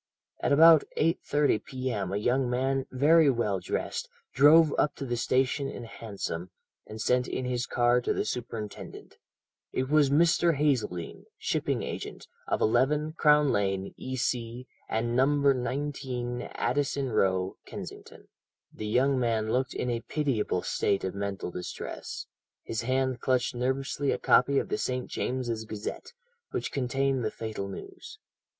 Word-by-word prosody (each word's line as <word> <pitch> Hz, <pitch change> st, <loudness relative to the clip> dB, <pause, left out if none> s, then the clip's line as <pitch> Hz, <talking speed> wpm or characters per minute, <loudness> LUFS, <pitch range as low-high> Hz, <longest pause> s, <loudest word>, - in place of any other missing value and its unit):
At -, -, 0 dB
about 160 Hz, +1 st, +8 dB
8.30 150 Hz, -5 st, +1 dB
p.m. 125 Hz, -8 st, -3 dB
a 100 Hz, -, 0 dB
young 125 Hz, +4 st, +1 dB
man, 135 Hz, +2 st, 0 dB
very 150 Hz, +4 st, +5 dB
well 110 Hz, -6 st, 0 dB
dressed, 90 Hz, -, -3 dB, 0.2 s
drove 150 Hz, +3 st, +6 dB
up 150 Hz, -, +2 dB
to 140 Hz, -, -5 dB
the 120 Hz, -2 st, -1 dB
station 130 Hz, +3 st, +1 dB
in 125 Hz, -, -7 dB
a -, -, -9 dB
hansom, 100 Hz, -6 st, -5 dB, 0.4 s
and 110 Hz, +1 st, -8 dB
sent 125 Hz, +3 st, +2 dB
in 130 Hz, -, -3 dB
his 125 Hz, -1 st, -1 dB
card 120 Hz, 0 st, +2 dB
to -, -, +2 dB
the -, -, -1 dB
superintendent. 115 Hz, -3 st, -6 dB, 0.5 s
It 130 Hz, +1 st, -2 dB
was 150 Hz, -2 st, +5 dB
Mr. 165 Hz, +2 st, +4 dB
Hazeldene, 125 Hz, -, -1 dB
shipping -, -, -1 dB
agent, -, -, -6 dB, 0.2 s
of -, -, 0 dB
11, 150 Hz, +7 st, +2 dB
Crown 150 Hz, -3 st, +4 dB
Lane, 95 Hz, -1 st, -1 dB
E.C., 125 Hz, -1 st, -3 dB, 0.2 s
and 120 Hz, +1 st, -1 dB
No. 130 Hz, +2 st, +4 dB
19, 130 Hz, -2 st, -1 dB
Addison 140 Hz, 0 st, 0 dB
Row, 95 Hz, -3 st, +1 dB
Kensington. -, -, -9 dB, 0.5 s
"The 110 Hz, -, -5 dB
young 130 Hz, +4 st, +2 dB
man 110 Hz, -3 st, 0 dB
looked 130 Hz, +2 st, 0 dB
in 125 Hz, -, -1 dB
a 120 Hz, -, -1 dB
pitiable 125 Hz, -, -1 dB
state 100 Hz, -, 0 dB
of 95 Hz, -, -2 dB
mental 100 Hz, -2 st, -4 dB
distress; 90 Hz, 0 st, -6 dB, 0.4 s
his 115 Hz, -, -3 dB
hand 130 Hz, +1 st, 0 dB
clutched 130 Hz, -1 st, +1 dB
nervously 135 Hz, +3 st, -1 dB
a -, -, +1 dB
copy 140 Hz, +2 st, +4 dB
of -, -, 0 dB
the -, -, -1 dB
St. 125 Hz, -1 st, -2 dB
James's 120 Hz, -3 st, -2 dB
Gazette, 110 Hz, -, -6 dB, 0.4 s
which -, -, -3 dB
contained 135 Hz, 0 st, 0 dB
the 110 Hz, -, 0 dB
fatal 110 Hz, -3 st, -5 dB
news. 390 Hz, -, -9 dB
125 Hz, 145 wpm, -28 LUFS, 115-140 Hz, 0.5 s, about